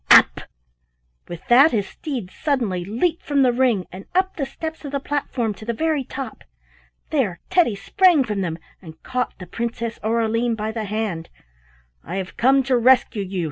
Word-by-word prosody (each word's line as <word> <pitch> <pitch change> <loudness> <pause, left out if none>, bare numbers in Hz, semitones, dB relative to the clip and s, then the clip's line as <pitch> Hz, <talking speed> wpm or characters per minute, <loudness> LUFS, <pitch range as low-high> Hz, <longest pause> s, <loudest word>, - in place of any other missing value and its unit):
up!" - - +7 0.9
With 175 0 -9
that 265 +6 +7
his 205 -4 0
steeds 250 - -6
suddenly 235 - -1
leaped 250 - -1
from 280 -2 +2
the 250 -2 +3
ring 240 -7 +2
and 190 +2 -9
up 375 +1 +2
the 275 -4 -2
steps 320 +3 -6
of 285 - -6
the 280 - 0
platform 265 -6 -2
to 200 - -13
the 230 +1 -3
very 315 0 0
top. 270 +1 -7 0.7
There 225 - 0
Teddy 350 - +3
sprang 350 - +4
from 210 -5 -2
them 165 -3 -2 0.2
and 160 -3 -13
caught 255 -1 -2
the 180 - -9
Princess 230 +3 -4
Aureline 230 +1 +1
by 215 0 -3
the 220 -1 -4
hand. 200 -6 -3 0.7
"I 175 - -6
have 190 -1 -4
come 265 +3 +4
to 260 -1 +2
rescue 245 -3 +4
you!" 190 0 -4
235 Hz, 180 wpm, -22 LUFS, 200-275 Hz, 0.9 s, up